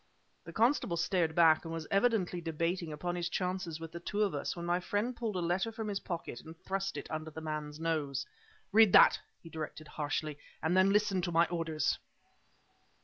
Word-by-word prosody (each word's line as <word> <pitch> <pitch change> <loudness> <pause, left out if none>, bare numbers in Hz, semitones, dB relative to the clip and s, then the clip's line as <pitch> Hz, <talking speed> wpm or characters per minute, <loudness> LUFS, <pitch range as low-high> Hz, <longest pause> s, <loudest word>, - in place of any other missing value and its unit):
The - - -8
constable 225 -7 +2
started 170 -2 +1
back 160 -2 +5
and 165 - -6
was 165 -1 -4
evidently 195 -4 +2
debating 165 +1 -2
upon 175 +4 -3
his 175 0 -2
chances 180 -3 -2
with 165 -1 -7
the 170 - -6
two 205 +4 -1
of 200 -5 0
us, 145 - -3
when 170 -1 -5
my 175 +1 +1
friend 205 +7 -1
pulled 225 -4 -3
a 180 - 0
letter 180 +6 0
from 220 -1 -5
his 200 -1 -1
pocket 165 -9 -5
and 160 +1 -12
thrust 195 +2 -3
it - - -5
under 155 0 -4
the 160 - -8
man's 155 -1 -5
nose. 155 -5 -1 0.5
"Read 220 -1 +6
that!" - - +8 0.2
he 165 - -10
directed 155 -1 -6
harshly, 150 0 -3 0.2
"and 160 +3 +2
then 190 +1 +5
listen 205 -2 +2
to 175 -1 -2
my 170 +1 +5
orders." 165 -3 -1
170 Hz, 200 wpm, -32 LUFS, 160-190 Hz, 0.5 s, that